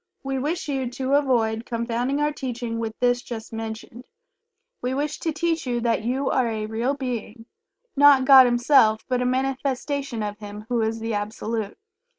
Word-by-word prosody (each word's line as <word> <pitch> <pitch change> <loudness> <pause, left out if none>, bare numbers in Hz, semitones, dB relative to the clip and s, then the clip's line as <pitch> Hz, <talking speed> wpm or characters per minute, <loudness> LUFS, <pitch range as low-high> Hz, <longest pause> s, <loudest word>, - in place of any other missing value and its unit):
We 270 -1 -2
wish 320 +7 -2
you 265 -3 -2
to 260 +2 -3
avoid 235 -6 +2
confounding 240 +3 -1
our 295 0 +2
teaching 245 -5 -4
with 225 -1 -5
this 245 0 +2
just 230 -2 -8
mentioned. 225 +2 -7 0.8
We 255 +1 -2
wish 295 +2 -2
to 325 - -1
teach 325 -1 -1
you 240 -1 0
that 230 -2 0
You 260 +4 -1
are 255 -2 +2
a 220 -2 -3
real 230 +6 -1
Being 235 -4 -5 0.5
not 280 -2 +6
God 265 -2 +9
Himself, 240 -3 +4
but 250 -1 0
a - - 0
manifestation 270 -1 -2
of 210 0 -5
Him 210 0 -9
who 240 -2 +1
is 220 +1 -1
the 225 0 -2
Absolute. 210 0 -3
245 Hz, 170 wpm, -24 LUFS, 225-270 Hz, 0.8 s, God